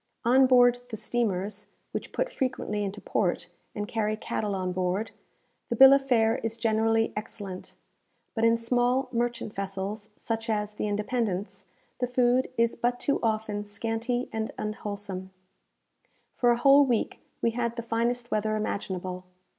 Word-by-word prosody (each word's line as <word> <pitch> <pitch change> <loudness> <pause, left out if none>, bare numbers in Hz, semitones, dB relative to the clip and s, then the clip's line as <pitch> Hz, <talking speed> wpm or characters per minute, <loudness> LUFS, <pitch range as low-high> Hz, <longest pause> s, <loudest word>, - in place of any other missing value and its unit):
On 260 +2 +6
board 245 -1 +6
the 220 - -5
steamers 210 -2 -2 0.2
(which - - -5
put - - -1
frequently 230 -5 -2
into 200 +1 -4
port, 180 -4 -1 0.3
and 205 0 -3
carry 215 -1 -1
cattle 210 -2 -2
on 185 -1 -2
board) 185 +4 -1 0.6
the 235 - 0
bill 270 +3 +10
of 275 0 +4
fare 225 -3 +3
is 225 0 -3
generally 225 0 +2
excellent; 205 -3 -7 0.6
but 225 - -1
in 230 0 +5
small 245 +3 +1
merchant 240 -3 -2
vessels, 195 +2 -4
such 225 0 -4
as 210 -1 -1
the 210 - -2
"Independence," 205 -3 -2 0.3
the 250 - 0
food 250 +1 +2
is 230 0 +2
but 245 +1 0
too 280 - +1
often 215 -2 -1
scanty 225 +4 -2
and 220 0 -2
unwholesome. 205 -3 -5 1.0
For 245 - +2
a 240 - +4
whole 275 +3 +7
week 245 -5 0 0.2
we 230 - +3
had 235 0 -2
the 235 - -4
finest 235 +1 -1
weather 215 0 +1
imaginable. 185 -3 -3
225 Hz, 150 wpm, -28 LUFS, 205-240 Hz, 1.0 s, bill